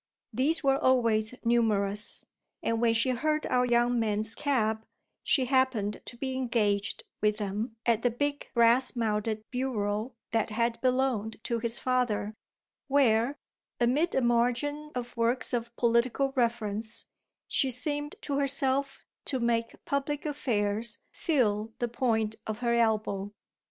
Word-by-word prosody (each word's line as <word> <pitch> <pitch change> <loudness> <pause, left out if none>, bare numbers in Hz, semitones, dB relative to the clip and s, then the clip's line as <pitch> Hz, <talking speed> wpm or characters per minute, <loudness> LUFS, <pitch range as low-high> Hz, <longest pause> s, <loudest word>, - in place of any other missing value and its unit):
These 310 +6 +2
were 270 0 +3
always 230 -3 +2
numerous, 210 -3 +1 0.4
and 230 0 0
when 230 -1 +3
she 235 +3 +3
heard 305 +5 0
our 250 0 +2
young 240 0 +2
man's 215 0 +1
cab 220 -6 0 0.4
she 260 - +2
happened 250 -6 +1
to 240 - -9
be 265 +1 -3
engaged 215 -6 0 0.2
with 210 0 +2
them 210 +3 -3
at 230 -2 +2
the 245 - +3
big 285 +4 -2
brass 235 +3 +4
mounted 215 -1 -1
bureau 230 -2 -2 0.2
that 225 -1 +1
had 230 +1 -1
belonged 255 -4 0
to 235 -1 -1
his 230 0 +3
father, 245 -5 0 0.5
where, 265 -1 +3 0.4
amid 270 +8 +2
a 265 - +3
margin 245 +5 0
of 245 -1 -5
works 235 +2 +1
of 235 -1 -1
political 240 +3 +2
reference, 225 -3 -1 0.4
she 270 - +2
seemed 290 +4 0
to 280 -1 -2
herself 275 0 +1 0.2
to 260 - -1
make 230 -1 -1
public 290 -2 -2
affairs 230 -6 -1
feel 225 - 0
the 240 - -1
point 225 -3 0
of 215 +1 -4
her 235 -1 +1
elbow. 215 -4 0
235 Hz, 135 wpm, -29 LUFS, 220-260 Hz, 0.5 s, brass